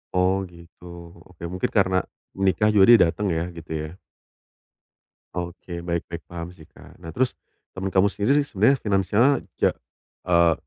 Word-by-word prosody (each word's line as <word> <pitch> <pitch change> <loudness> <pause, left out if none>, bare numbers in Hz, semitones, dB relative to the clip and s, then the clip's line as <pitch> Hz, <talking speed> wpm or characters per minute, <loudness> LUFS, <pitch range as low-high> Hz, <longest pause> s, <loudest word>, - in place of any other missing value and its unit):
Oh, 90 +1 +3
gitu. 85 0 -17 0.4
Oke, 90 -2 -16
mungkin 90 0 -2
karena 95 -2 +3 0.5
nikah 105 +3 +3
juga 100 -2 +6
dia 120 - +10
datang 105 - -3
ya, 80 - -1
gitu 80 -1 -10
ya? 80 +5 -9 1.4
Oke, 85 0 -6
baik 85 -1 -3
baik 85 0 -7
paham 85 0 -7
sih, 80 - -15
Kak. - - -17
Nah 80 - -7
terus 125 +8 0 0.4
temen 95 +1 -3
kamu 95 +1 +4
sendiri 105 +8 +1
sebenarnya 120 +3 +2
finansialnya 105 +6 +2 0.3
ja - - +4 0.6
eee, 85 -2 +4
90 Hz, 150 wpm, -24 LUFS, 85-100 Hz, 1.4 s, dia